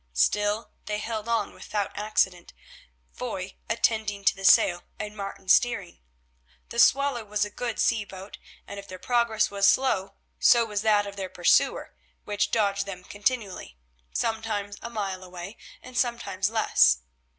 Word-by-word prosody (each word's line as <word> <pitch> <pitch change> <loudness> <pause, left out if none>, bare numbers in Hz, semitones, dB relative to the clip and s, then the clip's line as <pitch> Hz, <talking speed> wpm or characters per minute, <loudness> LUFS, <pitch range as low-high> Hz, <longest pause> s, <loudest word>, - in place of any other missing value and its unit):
Still 205 - +1 0.2
they 210 - -1
held 220 +1 -4
on 225 -3 0
without 205 -2 -4
accident, 195 -4 -1 0.6
Foy - - -5
attending 210 -3 0
to - - +4
the 195 - -10
sail 175 -2 +5 0.2
and 210 0 -6
Martin 195 -1 -7
steering. 200 -2 +2 0.7
The 235 - -4
Swallow 275 -2 +4
was 210 0 -1
a 210 - -8
good 240 -2 -4
sea 215 - +2
boat, 195 0 -11 0.3
and 200 - -8
if 200 - -11
their 185 - -8
progress 235 0 +1
was 200 0 +3
slow 200 -7 +2 0.2
so 235 -1 +5
was 210 -2 -2
that 210 -2 +3
of 200 0 -8
their 190 -1 -4
pursuer, 175 - +2 0.3
which 205 0 -1
dogged 200 -2 +1
them 180 -2 -7
continually, 205 - -3 0.3
sometimes 220 - -2
a 235 - -6
mile 195 -5 -4
away 180 +3 -9 0.3
and 255 0 -12
sometimes 235 -6 0
less. 70 - +4
205 Hz, 150 wpm, -26 LUFS, 195-225 Hz, 0.7 s, sail